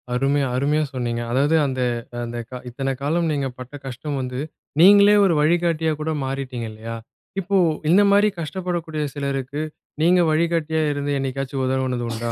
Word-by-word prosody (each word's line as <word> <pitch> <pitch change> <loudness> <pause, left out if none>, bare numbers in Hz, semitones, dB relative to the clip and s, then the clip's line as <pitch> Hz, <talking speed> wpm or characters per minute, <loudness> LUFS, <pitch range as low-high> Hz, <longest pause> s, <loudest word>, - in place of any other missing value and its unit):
அருமை 135 +3 +2
அருமையாக 150 +3 +1
சொன்னீங்க. 120 -2 -2
அதாவது, 140 +5 +2
அந்த 130 -2 -2 0.4
அந்த 120 0 -5 0.3
இத்தனை 135 +2 -2
காலம் 165 +3 +1
நீங்கப் 135 -4 -2
பட்ட 125 +2 -9
கஷ்டம் 135 +3 -4
வந்து 125 0 -4 0.4
நீங்களே 205 +2 +8
ஒரு 185 - +3
வழிகாட்டியாக 160 -1 +1
கூட 160 +1 -1
மாறிவிட்டீங்க 130 -3 -4
இல்லையா? 110 +1 -7 0.4
இப்போ 195 +1 0 0.3
இந்த 185 +5 +6
மாதிரி 205 +1 +5
கஷ்டப்படக்கூடிய 170 -1 -3
சிலருக்கு 140 0 -3 0.4
நீங்க 180 +2 +5
வழிகாட்டியாக 160 -1 +1
இருந்து 145 0 -2
எப்போதாவது 130 -1 -1
உதவியது 120 -1 -2
உண்டா? 115 +1 -3
145 Hz, 140 wpm, -22 LUFS, 130-165 Hz, 0.4 s, நீங்களே